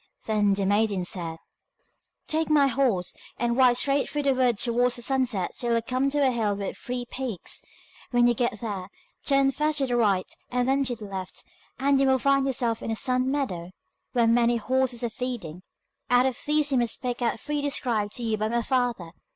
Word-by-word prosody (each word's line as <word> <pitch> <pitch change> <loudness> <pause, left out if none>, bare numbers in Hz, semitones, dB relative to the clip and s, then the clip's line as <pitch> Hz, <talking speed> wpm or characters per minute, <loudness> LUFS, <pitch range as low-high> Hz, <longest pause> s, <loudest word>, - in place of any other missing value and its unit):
Then 210 -2 +2
the 195 -1 -1
maiden 205 -2 +1
said: 170 -3 -2 0.9
'Take 315 +1 0
my 295 -2 +5
horse, 245 -9 +1 0.2
and 235 0 0
ride 250 -2 +5
straight 275 +2 +1
through 295 -1 -2
the 275 -1 +3
wood 250 -3 +2
towards 245 +2 +2
the 240 - -2
sunset 250 -8 0
till 235 -1 0
you 230 - +2
come 255 +3 0
to 285 -1 +2
a - - +3
hill 220 -4 0
with 200 -1 -4
three 250 0 -5
peaks. 250 -8 -4 0.5
When 240 -1 +3
you 240 - +4
get 240 -2 -1
there, 200 -5 -4 0.3
turn 275 -1 +3
first 300 +2 0
to 275 - +2
the 245 -2 -1
right 200 -6 +2 0.2
and 250 0 0
then 275 +1 +2
to 245 -1 -1
the 215 -2 -9
left, 190 -2 -6 0.3
and 275 0 +2
you 270 - +3
will 265 0 +4
find 275 +1 +2
yourself 240 -4 -1
in - - -5
a 225 - 0
sun 255 +2 +1
meadow, 190 -12 -2 0.4
where 240 -2 +3
many 235 +1 +3
horses 255 +1 0
are 235 - 0
feeding. 215 -9 -5 0.5
Out 245 +1 +5
of 260 -2 0
these 300 -1 +2
you 265 - +3
must 235 -2 0
pick 245 -1 -3
out 235 - +2
the - - -11
three 295 +5 -3
described 235 -7 -1
to 240 - -4
you 220 -1 0
by 215 +1 -1
my 235 +1 0
father. 245 -9 -1
245 Hz, 210 wpm, -26 LUFS, 220-265 Hz, 0.9 s, my